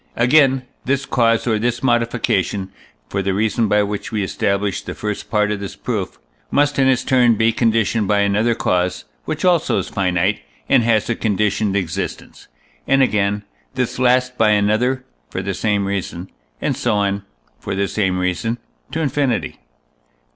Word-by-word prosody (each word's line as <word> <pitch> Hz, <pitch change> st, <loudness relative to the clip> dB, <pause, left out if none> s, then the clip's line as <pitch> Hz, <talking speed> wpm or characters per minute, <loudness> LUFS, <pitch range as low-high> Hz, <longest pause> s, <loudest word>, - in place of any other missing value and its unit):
Again, 130 Hz, +1 st, +4 dB, 0.2 s
this 135 Hz, +1 st, 0 dB
cause 115 Hz, -4 st, +2 dB
or 110 Hz, -3 st, +1 dB
this 120 Hz, +2 st, -1 dB
modification 115 Hz, -5 st, 0 dB, 0.4 s
(for 100 Hz, +9 st, -2 dB
the 95 Hz, 0 st, -1 dB
reason 110 Hz, +2 st, +1 dB
by 105 Hz, 0 st, +3 dB
which 100 Hz, +2 st, -4 dB
we 105 Hz, -3 st, -1 dB
established 100 Hz, +1 st, -1 dB
the -, -, -5 dB
first 105 Hz, -1 st, -4 dB
part 105 Hz, -1 st, +1 dB
of 105 Hz, -, -2 dB
this 100 Hz, -1 st, -6 dB
proof) -, -, -4 dB, 0.3 s
must 145 Hz, 0 st, +2 dB
in 135 Hz, -, +4 dB
its 130 Hz, -2 st, +2 dB
turn 125 Hz, -3 st, +4 dB
be 110 Hz, +2 st, +3 dB
conditioned 115 Hz, -2 st, +1 dB
by 105 Hz, 0 st, +3 dB
another 105 Hz, +4 st, +2 dB
cause, 90 Hz, -2 st, 0 dB, 0.2 s
which -, -, -3 dB
also 175 Hz, -3 st, +3 dB
is -, -, -2 dB
finite, 95 Hz, 0 st, 0 dB, 0.3 s
and -, -, +5 dB
has 110 Hz, -2 st, +2 dB
a 120 Hz, -, +1 dB
conditioned 105 Hz, -2 st, 0 dB
existence, 95 Hz, -5 st, -4 dB, 0.4 s
and, 135 Hz, 0 st, +4 dB
again, 105 Hz, -3 st, +1 dB, 0.3 s
this -, -, -2 dB
last 125 Hz, 0 st, +2 dB
by 110 Hz, -1 st, +5 dB
another 110 Hz, +5 st, +1 dB, 0.2 s
(for 95 Hz, -, -4 dB
the 100 Hz, +1 st, -2 dB
same 105 Hz, 0 st, 0 dB
reason); 95 Hz, -2 st, -4 dB, 0.3 s
and -, -, -1 dB
so -, -, 0 dB
on 100 Hz, -1 st, 0 dB, 0.4 s
(for 100 Hz, -, -4 dB
the 100 Hz, +1 st, 0 dB
same 95 Hz, 0 st, 0 dB
reason) 90 Hz, +6 st, -1 dB, 0.3 s
to 160 Hz, +3 st, -2 dB
infinity. 140 Hz, -4 st, -1 dB
105 Hz, 165 wpm, -19 LUFS, 100-120 Hz, 0.4 s, and